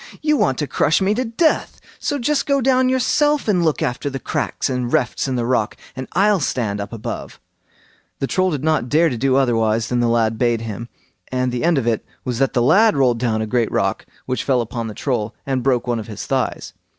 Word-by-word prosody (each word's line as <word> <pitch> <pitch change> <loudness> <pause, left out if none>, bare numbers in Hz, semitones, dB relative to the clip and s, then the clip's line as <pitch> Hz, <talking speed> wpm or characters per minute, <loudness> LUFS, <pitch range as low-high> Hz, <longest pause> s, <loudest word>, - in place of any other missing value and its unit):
You 300 0 +2
want 135 - +1
to 150 - -1
crush 155 +2 +2
me 195 +1 +2
to 250 +4 -1
death; 260 +7 0 0.2
so 290 - -1
just 285 +3 0
go 280 -1 +3
down 255 0 +3
yourself 290 +3 +2
and 185 -5 +2
look 155 -3 +1
after 125 +4 -2
the 135 -1 -5
cracks - - -2
and 125 -2 -2
refts 125 - 0
in 130 - -1
the 120 -1 -1
rock, 120 -3 0 0.2
and 130 0 -6
I'll 200 +1 +3
stand 110 -8 -1
up 100 - -6
above." 115 -2 -6 0.8
The - - -1
Troll 185 +6 +1
did 145 -5 -3
not 155 -6 +1
dare 160 +4 +4
to 125 - -3
do 130 +2 +1
otherwise 115 -4 +1
than 125 - 0
the 120 - +2
lad 115 -1 +1
bade 120 -2 +1
him, 115 +1 -6 0.4
and 125 -1 0
the 120 - -3
end 170 -2 +3
of 130 - 0
it 115 -2 0 0.2
was 125 -2 -2
that 135 -1 +1
the 120 - +2
lad 210 - +5
rolled 125 -4 +2
down 110 -3 0
a - - -2
great 115 0 0
rock, - - -1 0.2
which 130 0 -2
fell 130 -3 +2
upon 115 0 -4
the 110 - -7
Troll, 115 -5 -2
and 135 -2 -1
broke 125 -2 +1
one 120 -2 -1
of 110 - -7
his 105 -3 -7
thighs. - - -2
130 Hz, 230 wpm, -20 LUFS, 120-175 Hz, 0.8 s, lad